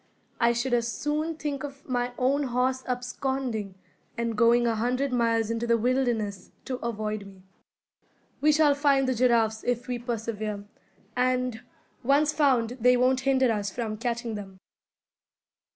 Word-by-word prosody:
I 235 0 +4
should 240 +2 -1
as 235 -1 +1
soon 305 +4 -2
think 295 -3 -4
of 280 -1 -9
my 245 -1 -1
own 275 +3 +1
horse 255 +1 0
absconding, 250 -4 -3 0.4
and 235 -1 -1
going 235 +2 +4
a 230 - +2
hundred 250 +4 0
miles 230 -2 +1
into 230 +1 -2
the 235 0 +4
wilderness, 235 -4 -1 0.2
to 255 - -3
avoid 215 -3 -3
me. 190 -1 -15 1.0
We 305 +1 +5
shall 300 -1 +4
find 280 -2 +2
the 260 - +2
giraffes 230 -3 +2
if 245 -1 -1
we 245 -1 -2
persevere; 220 -3 -4 0.5
and, 250 -1 0 0.4
once 285 +4 +3
found, 255 -4 +2
they 250 +1 +5
won't 255 +1 +3
hinder 260 -2 +3
us 205 -2 -1
from 220 0 -4
catching 235 0 -3
them." 195 -2 -8
245 Hz, 150 wpm, -27 LUFS, 230-260 Hz, 1.0 s, We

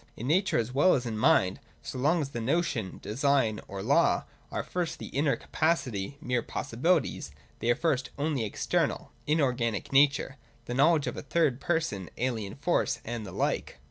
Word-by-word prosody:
— - - -35
In 115 - -5
Nature 185 +8 +2
as 115 +2 -1
well 180 +7 +5
as 125 -3 -2
in 115 -2 -3
Mind, 110 - +3 0.2
so 130 - -6
long 155 +6 +3
as 140 - -3
the 120 -4 -5
notion, 130 - -1
design, 130 -1 +1
or 95 0 -6
law - - +3 0.3
are - - -2
at - - -12
first 180 -2 -2
the - - -8
inner 140 +1 +1
capacity, 140 - -1
mere 125 -4 0
possibilities, 155 +10 0 0.3
they 115 - -1
are 120 - +5
first 135 -5 0
only 145 -2 0
an 110 - -1
external, - - -1 0.2
inorganic 125 -8 0
nature, 140 0 +3 0.3
the 120 - -4
knowledge 150 +3 +4
of - - -4
a - - -4
third 145 -3 +1
person, 160 - -1
alien 115 -6 -2
force, 145 +5 0
and 115 -2 -4
the - - -7
like. - - -2
135 Hz, 185 wpm, -29 LUFS, 115-155 Hz, 0.3 s, well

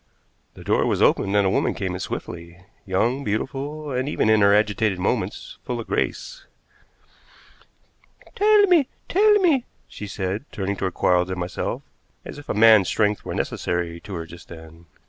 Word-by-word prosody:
The - - -12
door - - +1
was - - 0
opened, 100 +1 +2
and 100 -1 +3
a - - +3
woman - - 0
came 95 -2 -3
in 90 - -5
swiftly, 85 0 -7 0.2
young, 120 +9 0
beautiful, 140 +7 -4
and, 130 +2 -2
even 110 -6 +1
in 110 -1 +4
her 100 0 +5
agitated 105 -1 +2
movements, 90 - -3
full 120 -1 -4
of 115 - -6
grace. - - -3 1.9
"Tell 420 +1 +4
me! 345 -8 +4 0.2
Tell 420 +4 +4
me!" 340 - +3 0.2
she 105 - -8
said, 100 +4 -4
turning 100 0 -3
toward 95 -2 -3
Quarles 90 0 +2
and 95 -1 -4
myself, 90 0 -4 0.4
as - - -8
if 145 - -14
a - - -1
man's 110 -3 +6
strength 105 +1 0
were - - -5
necessary 85 -1 -3
to 95 +2 -8
her 85 -1 -5
just 85 0 -13
then. 80 0 -13
105 Hz, 170 wpm, -23 LUFS, 90-135 Hz, 1.9 s, man's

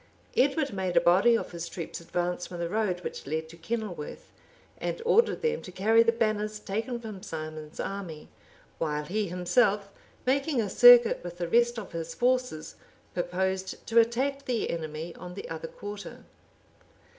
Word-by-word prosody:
Edward 280 0 +2
made 190 -2 -1
a - - +10
body 195 +7 +5
of - - -6
his 170 -1 -5
troops 170 -1 -6
advance 175 +1 -2
from 175 - -7
the 170 0 -2
road 190 -2 -1
which - - -6
led 160 +2 -2
to 165 - -11
Kenilworth, 215 - -5 0.5
and - - -3
ordered 465 0 +3
them 470 0 +1
to 185 - -9
carry 220 +5 +4
the 230 0 +4
banners 215 -2 -1
taken 225 +4 -3
from 215 -5 -8
Simon's 155 -2 -7
army; 180 -6 -5 0.5
while 150 -2 -1
he 210 +5 -1
himself, 195 +3 +2 0.4
making 275 +1 +1
a 210 -4 -1
circuit 245 -4 +8
with 175 0 -7
the 175 -1 -2
rest 240 +5 +3
of 215 - -6
his 165 -1 -5
forces, 250 -10 0 0.4
purposed 190 +2 -2
to 230 +1 +4
attack 265 +5 +1
the 240 -3 -1
enemy 160 0 -5
on 180 0 -9
the - - -6
other 165 0 -5
quarter. 205 +4 -8
195 Hz, 165 wpm, -28 LUFS, 170-235 Hz, 0.5 s, a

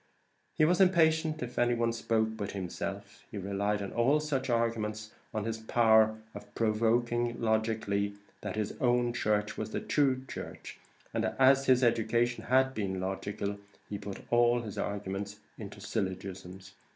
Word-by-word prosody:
He 155 - +4
was 180 +4 +3
impatient 160 -5 +3
if 125 0 -5
any 120 0 +3
one 115 0 +1
spoke 110 -1 +1
but 100 -2 -4
himself. 100 +1 -5
He 110 - -7
relied 100 +2 -1
in 100 - -6
all 130 +6 +3
such 135 -3 -2
arguments 110 -2 -1 0.2
on 110 - -2
his 115 0 -3
power 110 -1 +4 0.2
of 105 0 -11
proving 120 +2 +1
logically 110 -3 0 0.3
that 105 -2 -4
his 105 -1 -2
own 120 -1 +2
church 105 -2 0
was 110 0 -3
the - - -2
true 130 -3 +1
church, - - -8 0.3
and - - 0
as 135 +1 +5
his 130 0 +5
education 120 +1 +1
had 130 +1 +3
been 95 -5 -2
logical, 100 +2 -3 0.3
he 100 - -3
put 100 -1 -7
all 120 0 +4
his 105 -3 -7
arguments 100 0 -4 0.2
into - - -8
syllogisms. 95 -1 -5
110 Hz, 150 wpm, -30 LUFS, 100-120 Hz, 0.3 s, as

